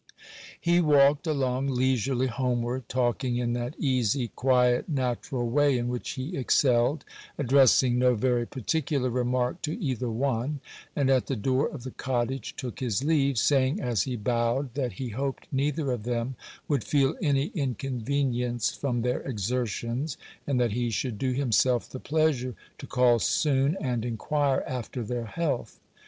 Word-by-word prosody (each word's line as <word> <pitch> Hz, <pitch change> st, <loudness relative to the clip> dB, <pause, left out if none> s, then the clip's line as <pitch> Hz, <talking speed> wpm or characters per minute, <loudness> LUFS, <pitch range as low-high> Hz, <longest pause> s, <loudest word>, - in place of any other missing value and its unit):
He 175 Hz, 0 st, +3 dB
walked 145 Hz, 0 st, +4 dB
along 135 Hz, -3 st, 0 dB
leisurely 130 Hz, 0 st, +1 dB
homeward, 125 Hz, -1 st, -2 dB
talking 125 Hz, 0 st, 0 dB
in 120 Hz, -1 st, 0 dB
that 120 Hz, +3 st, -3 dB
easy, 125 Hz, -3 st, +1 dB
quiet, 125 Hz, -, +2 dB
natural 130 Hz, -2 st, -1 dB
way 140 Hz, +2 st, +3 dB
in 120 Hz, 0 st, -2 dB
which 125 Hz, 0 st, -3 dB
he 135 Hz, +7 st, -5 dB
excelled, 130 Hz, +1 st, +2 dB, 0.3 s
addressing 130 Hz, -2 st, +4 dB
no 125 Hz, -1 st, +4 dB
very 120 Hz, +1 st, +1 dB
particular 135 Hz, 0 st, -1 dB
remark 125 Hz, +4 st, 0 dB
to 155 Hz, 0 st, -3 dB
either 130 Hz, -4 st, -2 dB
one, 130 Hz, +4 st, -1 dB, 0.4 s
and 135 Hz, -2 st, +2 dB
at 130 Hz, -2 st, +2 dB
the 135 Hz, -, -1 dB
door 130 Hz, +5 st, +1 dB
of 135 Hz, -6 st, -8 dB
the 130 Hz, -, -6 dB
cottage 130 Hz, +1 st, -2 dB
took 125 Hz, -3 st, -6 dB
his 125 Hz, -1 st, -1 dB
leave, 140 Hz, -4 st, +2 dB
saying, 135 Hz, -, +2 dB
as 120 Hz, -, 0 dB
he 125 Hz, +4 st, -2 dB
bowed, 120 Hz, +3 st, 0 dB
that 130 Hz, -3 st, -2 dB
he 130 Hz, -3 st, -5 dB
hoped 135 Hz, +4 st, -3 dB
neither 140 Hz, +1 st, 0 dB
of 120 Hz, -3 st, -2 dB
them 120 Hz, +2 st, -2 dB, 0.3 s
would 140 Hz, -7 st, 0 dB
feel 135 Hz, +5 st, +2 dB
any 145 Hz, -3 st, +1 dB
inconvenience 125 Hz, -, -1 dB
from 120 Hz, -4 st, -2 dB
their 125 Hz, 0 st, 0 dB
exertions, 120 Hz, -, -2 dB, 0.3 s
and 135 Hz, -3 st, +1 dB
that 120 Hz, -3 st, +2 dB
he 120 Hz, +2 st, -1 dB
should 115 Hz, -1 st, -2 dB
do 130 Hz, -1 st, 0 dB
himself 125 Hz, -2 st, +2 dB
the 130 Hz, -, -8 dB
pleasure 145 Hz, -6 st, 0 dB, 0.2 s
to -, -, -8 dB
call 125 Hz, -2 st, +3 dB
soon, 140 Hz, -, +2 dB
and 125 Hz, -5 st, -1 dB
inquire 135 Hz, +4 st, 0 dB
after 125 Hz, -1 st, -4 dB
their 120 Hz, +1 st, -3 dB
health. 140 Hz, +1 st, -3 dB
130 Hz, 155 wpm, -27 LUFS, 120-140 Hz, 0.4 s, walked